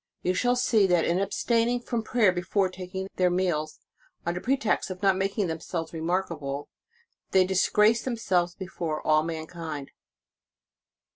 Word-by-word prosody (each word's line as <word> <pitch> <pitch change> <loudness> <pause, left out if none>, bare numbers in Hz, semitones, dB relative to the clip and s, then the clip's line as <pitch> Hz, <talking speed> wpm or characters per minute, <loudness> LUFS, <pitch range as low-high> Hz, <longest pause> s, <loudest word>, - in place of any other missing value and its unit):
You 180 - +1
shall 245 +6 +2
see 220 -5 +3
that 175 -3 +3
in 170 +2 +1
abstaining 230 +4 +1
from 235 -1 -2
prayer 220 -3 +3
before 185 +2 0
taking 185 +1 -6
their 180 -1 +4
meals, 175 -4 -1 0.5
under 175 +1 -2
pretext 260 -6 0
of 185 +1 -7
not 195 -1 +4
making 195 +2 0
themselves 165 0 -4
remarkable, 160 -4 -2 0.6
they 185 -1 +4
disgrace 210 +4 +3
themselves 185 -8 0
before 170 -5 -4
all 155 0 +4
mankind. 160 -2 -5
185 Hz, 135 wpm, -27 LUFS, 165-205 Hz, 0.6 s, their